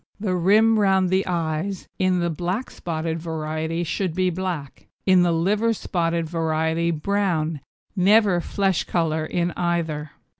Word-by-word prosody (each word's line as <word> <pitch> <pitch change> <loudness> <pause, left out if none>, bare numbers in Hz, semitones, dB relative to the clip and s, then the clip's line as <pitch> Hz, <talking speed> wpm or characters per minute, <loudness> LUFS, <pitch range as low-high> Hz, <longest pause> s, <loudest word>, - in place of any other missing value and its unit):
THE 195 -3 -1
RIM 215 +5 +4
ROUND 190 -2 +3
THE 190 +1 +1
EYES 170 +2 -2
in 185 -2 +2
the 170 0 0
black 180 - -3
spotted 165 -1 -3
variety 160 +1 -3
should 175 0 -2
be 185 -1 +1
black, 175 -6 -5 0.2
in 185 -2 +5
the 175 -1 +3
liver 205 +7 +1
spotted 170 -5 -1
variety 160 0 0
brown 165 -3 -1 0.3
never 200 -1 +4
flesh 195 0 0
colour 160 -2 0
in 175 0 -1
either. 165 -4 -2
175 Hz, 140 wpm, -23 LUFS, 160-190 Hz, 0.3 s, in